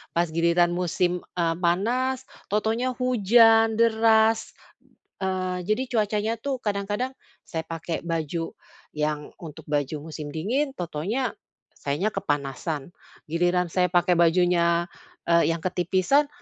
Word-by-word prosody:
Pas 170 +1 +2
giliran 170 +2 +3
musim, 180 0 0
e 175 - 0 0.2
panas, 240 +9 0 0.3
tahu-tahunya 220 +4 0
hujan 225 -2 +5
deras, 225 -1 +3 0.7
eee, 185 -1 -1
jadi 215 +5 +1
cuacanya 215 0 +1
tuh 275 0 -2
kadang-kadang, 205 +5 -2 0.3
saya 160 -1 -3
pakai 165 0 -4
baju 165 0 -2 0.4
yang 150 -1 -2
untuk 155 -4 -9
baju 145 0 -1
musim 150 -1 -6
dingin 255 - 0
tahu-tahunya 190 - -2 0.5
sayanya 145 +9 -1
kepanasan. 145 +2 -3 0.4
Giliran 175 +2 +1
saya 180 0 +2
pakai 175 0 +3
bajunya, 170 0 +3 0.4
e 170 0 +4
yang 165 - -2
ketipisan, 185 - +2
180 Hz, 115 wpm, -25 LUFS, 165-220 Hz, 0.7 s, hujan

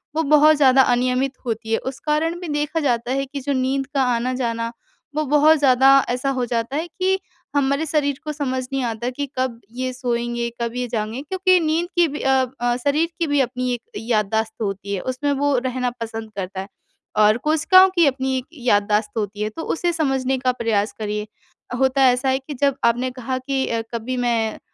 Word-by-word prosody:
वो 320 - +1
बहुत 305 +1 +6
ज़्यादा 265 -2 +6
अनियमित 255 +2 +1
होती 225 -1 -3
है - - +2
उस 250 - -15
कारण 325 +3 0
भी 355 - -5
देखा 295 +2 -1
जाता 245 -3 0
है 275 +1 0
कि 275 +1 -7
जो 280 +2 -1
नींद 265 +1 0
का 270 - +3
आना-जाना 235 -1 -2 0.4
वो 310 - +1
बहुत 300 +3 +5
ज़्यादा 265 -1 +5 0.2
ऐसा 250 +3 -1
हो 255 -2 -1
जाता 235 +2 -2
है 330 +3 -2
कि 375 +3 0 0.4
हमारे 280 +2 +1
शरीर 285 -2 0
को 305 - -3
समझ 260 -3 -2
नहीं 270 -2 0
आता 235 +1 -2
कि 285 +3 -4
कब 255 -3 -1
ये 255 +1 -3
सोएँगे, 240 -1 -2
कब 235 0 -2
ये 250 0 -2
जाएँगे? 225 +2 -3
क्योंकि 370 +3 +2
नींद 320 +2 0
की 345 - +5
भी 295 0 -5
अ, 265 -1 +3 0.4
शरीर 305 +4 +2
की 335 - +1
भी 290 -1 +2
अपनी 250 0 -1
एक 240 - -4 0.2
याददाश्त 220 -1 0
होती 200 -1 -3
है 185 - -4
उसमें 260 +3 -2
वो 285 -1 +1
रहना 250 0 -1
पसंद 225 -1 -5
करता 190 0 -4
है 195 - -8 0.5
और 215 +1 +5
कोशिकाओं 370 +5 +6
की 340 - +5
अपनी 265 -1 0
एक 255 - -4
याददाश्त 210 -5 +1
होती 205 -1 -3
है 215 - 0
तो 320 - -8
उसे 350 +1 0
समझने 270 -4 0
का 255 0 +2
प्रयास 220 -3 0
करिए। 210 0 -3 0.5
होता 265 +1 +3
ऐसा 250 +2 +1
है 265 0 +1
कि 275 +2 -8
जब 280 -2 +3
आपने 245 +2 +1
कहा 255 0 -4
कि 265 0 -1
अ, 230 -1 -1
कभी 235 +2 -3
मैं 235 -3 0
255 Hz, 200 wpm, -21 LUFS, 235-285 Hz, 0.5 s, बहुत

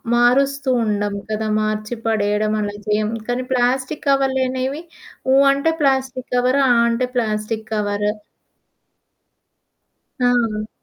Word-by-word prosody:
మారుస్తూ 275 +3 +2 0.2
ఉండం 205 -1 -1
కదా! 215 0 -2
మార్చి 215 +2 -2
పడేయడం 210 -1 +1
అలా 205 0 -3
చేయం. 210 0 +1 0.2
కానీ 245 +1 -1
ప్లాస్టిక్ 255 +4 0
కవర్లనేవి 265 +1 0 0.5
ఊ - - +5 0.2
అంటే 280 +4 +1
ప్లాస్టిక్ 265 -2 0
కవర్. 250 +2 +2
ఆ - - +5 0.2
అంటే 235 +2 0
ప్లాస్టిక్ 220 -1 -2
కవర్. 205 -1 0 2.2
ఆ! 225 -3 0
240 Hz, 105 wpm, -20 LUFS, 215-265 Hz, 2.2 s, ఊ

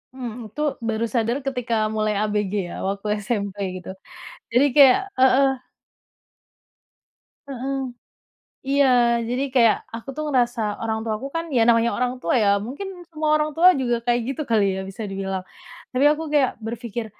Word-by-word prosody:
Mhm, 235 -4 -7
itu 300 - -6 0.3
baru 225 +1 0
sadar 235 +2 +1
ketika 250 -3 -2 0.2
mulai 215 0 0
ABG 210 -2 -1 0.2
ya, - - -7
waktu 200 +1 -4 0.2
SMP 200 -3 -2 0.2
gitu, 180 - -11 0.7
jadi 260 +3 +5
kayak 280 +4 +7 0.2
heeh. 265 +1 +5 2.0
Heeh. 270 0 -4 0.9
Iya, 250 -4 +3
jadi 255 +3 -1
kayak 230 -4 +5 0.2
aku 230 +4 -7
tuh 305 - -2
ngerasa 235 -4 0
orang 220 -1 -1
tua 220 - -1
aku 275 - -4
kan 330 0 -1
ya 235 - +3
namanya 230 0 +4
orang 250 +1 -1
tua - - -1
ya, 200 -1 +4
mungkin 350 - -7
semua 305 0 -1
orang 305 0 -1
tua 355 0 +5
juga 240 -3 0
kayak 240 0 +1
gitu 305 - -5
kali 215 -3 +3
ya, 190 - -3
bisa 210 +3 -6
dibilang. 195 -1 -4 0.5
Tapi 265 +3 +2
aku 305 +2 0
kayak 275 -3 +2
berpikir, 235 0 -5
240 Hz, 155 wpm, -23 LUFS, 220-270 Hz, 2.0 s, kayak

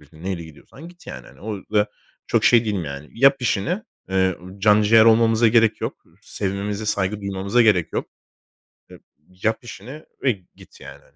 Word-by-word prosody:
biletini 80 +3 -18
neyle 95 -3 -4
gidiyorsan 135 - -14
git." 175 0 -18
yani, - - -9
hani. - - -18
O 105 0 -5 0.2
da 105 0 +3 0.4
çok - - +1
şey 120 -1 +5
değilim 100 -5 -2
yani? 70 +1 -8
"Yap 135 +2 +4
işini, 125 - -1 0.3
eee, 95 -1 +1 0.2
can 105 +1 +4
ciğer 110 +1 +6
olmamıza 115 0 +4
gerek 115 -1 +3
yok. - - -5 0.2
Sevmemize 100 +2 -4
saygı 100 0 -1
duymamıza 100 +4 0
gerek 95 -7 +2
yok. - - -2 0.8
Ya 90 - -13 0.4
yap 110 +1 +1
işini 120 +8 -10 0.2
ve 130 - +3 0.2
git, - - -18
yani." - - -12
105 Hz, 165 wpm, -22 LUFS, 95-115 Hz, 0.8 s, ciğer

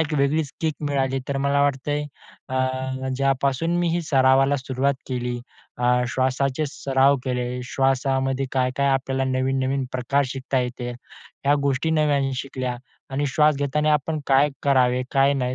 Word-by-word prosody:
एक 160 -1 -1
वेगळीच 140 +1 +1
किक 160 -2 0
मिळाली. 135 -1 0
तर 140 - -1
मला 140 0 +2
वाटतं 140 0 0
आहे, 150 0 0 0.4
अ, 130 0 -2
ज्यापासून 135 +4 +1
मी 175 -1 +1
ही 175 - 0
सरावाला 135 -1 +3
सुरुवात 135 +1 -1
केली, 125 -1 -2 0.4
अ, 125 0 +3
श्वासाचे 130 +3 0
सराव 135 +1 +2
केले, 125 0 -2
श्वासामध्ये 135 +1 0
काय-काय 130 +1 +1
आपल्याला 135 0 0
नवीन-नवीन 130 +1 0
प्रकार 130 +3 +1
शिकता 130 0 -2
येते. 125 0 -4 0.5
ह्या 145 +1 +4
गोष्टी 140 +3 0
नव्याने 145 -3 +2
शिकल्या 130 -2 -4 0.3
आणि 140 +2 -1
श्वास 150 -1 +4
घेताना 150 +2 +1
आपण 150 +1 0
काय 140 +2 +4
करावे, 130 -2 +3
काय 135 +1 +4
नाही. 125 -1 -1
135 Hz, 145 wpm, -23 LUFS, 130-140 Hz, 0.5 s, ह्या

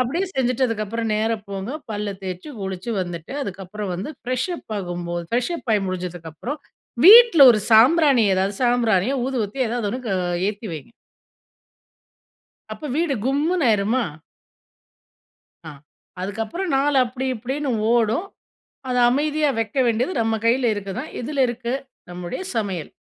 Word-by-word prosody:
அப்டீயே 305 +10 0
செஞ்சிட்டதுக்கு 250 -4 0
அப்புறம் 225 +2 -3
நேரா 220 +2 0
போங்க, 195 +3 -4 0.2
பல்ல 210 -1 -3
தேச்சு 185 +5 -6
குளிச்சு 190 +3 -5
வந்துட்டு, 175 +1 -6
அதுக்கப்புறம் 195 -1 -6
வந்து 190 +11 -5
ஃப்ரெஷப் 255 +8 -3
ஆகும்போது, 175 -2 -4
ஃப்ரெஷப் 250 +5 -2
ஆயி 205 - +1
முடிஞ்சதுக்கப்புறம் 180 - -5 0.5
வீட்ல 440 -5 +9
1 215 - +1
சாம்பிராணி, 260 +2 +6
எதாவது 190 +2 0
சாம்பிராணியோ, 240 -2 +2
ஊதுபத்தியோ 255 0 -1
எதாவது 230 -2 -2
1 255 - -4
க 195 - 0 0.4
ஏத்தி 210 +2 -5
வைங்க. 155 +3 -8 1.8
அப்ப - - -9
வீடு 325 -3 +1
கும்முன்னு 295 +4 +1
ஆயிருமா? 220 +4 +1 1.6
ஆ - - -6 0.5
அதுக்கு 200 +4 -3
அப்புறம் 345 - -4
நாள் 280 +1 +2
அப்டி, 255 +2 -4
இப்டீன்னு 265 +5 -3 0.2
ஓடும். 235 - +1 0.6
அத 250 - 0
அமைதியா 300 +2 +1
வைக்க 225 +3 -3
வேண்டியது, 235 +8 0
நம் 225 -1 -1
கையில 240 +1 +3
இருக்கு 200 -1 -5
தான். 300 - -7
எதுல 275 +2 0
இருக்கு? 240 0 -3 0.4
நம்முடைய 175 - -6
சமையல். 195 -8 -3
230 Hz, 130 wpm, -22 LUFS, 200-265 Hz, 1.8 s, வீட்ல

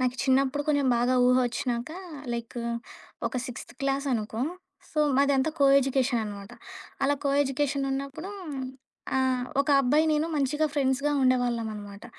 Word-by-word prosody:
నాకు 255 -1 +1
చిన్నప్పుడు 270 +2 +2
కొంచెం 285 -3 +2
బాగా 245 +2 +2
ఊహ 250 - +5
ఒచ్చినాక, 240 +2 -3 0.4
లైక్ 235 +1 -6 0.7
ఒక - - -5
సిక్స్త్ 250 - -8
క్లాస్ 275 +1 0
అనుకో. 220 0 -2 0.5
సో 305 - -4 0.2
మాదంతా 280 +1 +3
కో 280 - +5
ఎడ్యుకేషన్ 260 -2 +1
అనమాట. 200 +1 -8 0.5
అలా 285 +1 +3
కో 280 - +2
ఎడ్యు 270 -1 -4
కేషన్ 275 -1 +1
ఉన్నప్పుడు 275 +7 -5 0.9
ఆహ్, 260 -1 +1 0.2
ఒక 295 - -9
అబ్బాయి 290 +4 +3
నేను 305 +2 +1
మంచిగా 295 +2 +1
ఫ్రెండ్స్‌గా 280 +1 +1
ఉండేవాళ్ళమనమాట. 230 -5 -1
265 Hz, 140 wpm, -27 LUFS, 245-280 Hz, 0.9 s, ఊహ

